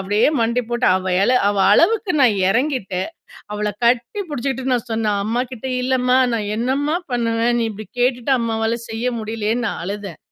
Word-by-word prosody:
அப்படியே 205 +5 +2
மண்டி 235 +2 +1
போட்டு 240 +1 0
அவ 185 0 -3
இல 225 - +3 0.2
அவ 205 - -1 0.2
அளவுக்கு 410 - +3
நான் 225 -6 +4
இறங்கிட்டேன். 230 - -1 0.4
அவள 210 0 -2 0.2
கட்டி 245 - +1
பிடிச்சிட்டு 265 -1 -2
நான் 245 0 -3
சொன்னேன். 215 -2 0
அம்மாகிட்ட 245 +2 -3
இல்லம்மா, 255 0 +2 0.2
நான் 210 -2 -2
என்னம்மா 275 +7 0 0.2
பண்ணுவேன். 235 0 +1
நீ 230 - +1
இப்படி 215 0 -9
கேட்டுட்டு 250 +1 +1
அம்மாவால 225 0 -1
செய்ய 225 +2 -3
முடியலையே! 220 0 -2
ன்னு 245 - -1
நான் - - -5
அழுதேன். 195 -3 -6
235 Hz, 165 wpm, -20 LUFS, 215-255 Hz, 0.4 s, நான்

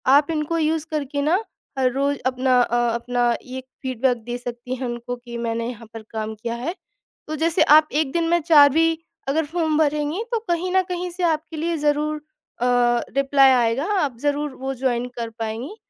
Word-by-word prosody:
आप 290 +3 +4
इनको 315 +1 -1
यूज़ 315 0 0
करके 285 -1 -2
न 320 +6 +3 0.4
हर 255 -1 +3
रोज़ 280 +1 0
अपना 255 0 +2
अ, 240 0 +1
अपना 240 0 0
ये 260 +1 -7 0.2
फ़ीडबैक 255 -1 +1
दे 240 0 -3
सकती 245 +1 -6
हैं 260 0 -4
उनको 240 +1 -4
कि 240 -1 -9
मैंने 230 0 -2
यहाँ 230 -2 -9
पर 225 - -7
काम 220 0 -4
किया 235 +2 -4
है। 285 +10 -4 0.5
तो 310 - -3
जैसे 330 +2 +2 0.2
आप 305 - -4
1 295 -3 +1
दिन 335 -1 +1
में 345 - +3
4 295 -3 +7
भी 325 +1 +2 0.3
अगर 315 +2 +1
फ़ॉर्म 320 -1 0
भरेंगी 300 +5 0
तो 465 - +1
कहीं 350 +2 0
न 375 - +6
कहीं 360 0 -3
से 360 +1 -5
आपके 320 -1 0
लिए 335 +1 -1
ज़रूर 300 +1 +1 0.5
अ, - - +2 0.5
रिप्लाई 275 -1 +5
आएगा। 245 +2 +2
आप 270 -7 -1
ज़रूर 290 0 -1
वो 270 +1 -4
जॉइन 245 -2 +1
कर 230 -1 -3
पाएँगी। 225 - -4
280 Hz, 195 wpm, -22 LUFS, 245-315 Hz, 0.5 s, 4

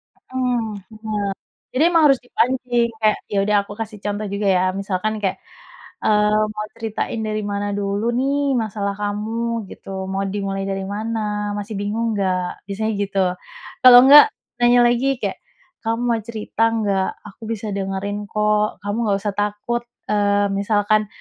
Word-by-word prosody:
M - - -24
mmm, 250 -2 +1 0.3
bener. 220 -1 -14 0.7
Jadi 265 - +2
emang 335 -2 +4
harus 270 - +1
dipancing, 245 -1 0
kayak, 215 -1 +3
ya, 205 - 0
udah, 210 - +3
aku 205 - -9
kasih 220 -1 -5
contoh 205 +1 -2
juga, 200 +1 -2
ya, 180 - +3
misalkan 195 +2 -2
kayak, 190 - -1 0.6
eee, 210 0 +3
"Mau 210 0 -3
ceritain 225 0 -3
dari 215 0 -2
mana 200 0 -2
dulu, 200 +3 -1
nih, 275 +2 +1
masalah 205 -2 -2
kamu?" 220 +2 -2
gitu. 190 -1 -7
"Mau 195 +1 -1
dimulai 195 0 -3
dari 195 0 -2
mana? 210 0 -3
Masih 205 +1 -5
bingung 220 +3 -1
nggak?" 185 -2 -2
Biasanya 220 +2 -2
gitu. 200 -1 -1 0.7
Kalau 245 -1 +11
nggak, 290 +2 +10 0.4
nanya 240 0 +6
lagi 255 +3 +2
kayak, - - -3 0.5
"Kamu 230 +1 0
mau 230 -1 +2
cerita 220 0 -3
nggak? 200 -4 0 0.2
Aku 205 - -15
bisa 225 -1 -3
dengerin, 200 +1 -3
kok, 210 -1 +1
kamu 205 +1 -2
nggak 200 -1 +2
usah 205 - 0
takut, 210 +3 -1 0.3
eee, 205 -1 +2
misalkan 205 +1 +1
210 Hz, 155 wpm, -21 LUFS, 200-230 Hz, 0.7 s, Kalau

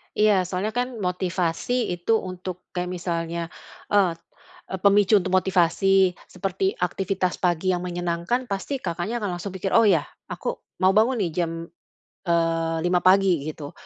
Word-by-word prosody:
Iya, 210 -3 +4
soalnya 190 +4 -2
kan, 245 -1 -3
motivasi 180 +5 -1
itu 175 +6 +1
untuk, 185 -1 -7
kayak 180 0 -3
misalnya, 170 -1 -3 0.4
eee, 195 -4 +4 0.5
e - - -4
pemicu 205 +1 +5
untuk 190 - -3
motivasi. 185 +1 +3 0.2
Seperti 190 +1 -2
aktivitas 185 0 -1
pagi 180 +1 +1
yang 180 - -2
menyenangkan, 175 +7 -2
pasti 200 +7 -3
Kakaknya 190 +4 -3
akan 185 -5 -3
langsung 195 +2 -5
pikir, 190 +1 -3
"Oh 230 - +7
iya, 170 -7 +4 0.2
aku - - -4 0.2
mau 185 - +6
bangun 230 +4 +4
nih, 175 -5 0
jam, 165 - -3 0.8
eee, 165 -1 +1
5.00 175 0 +2
pagi," 185 -5 +4
gitu. 150 -2 -6
185 Hz, 145 wpm, -24 LUFS, 175-200 Hz, 0.8 s, Oh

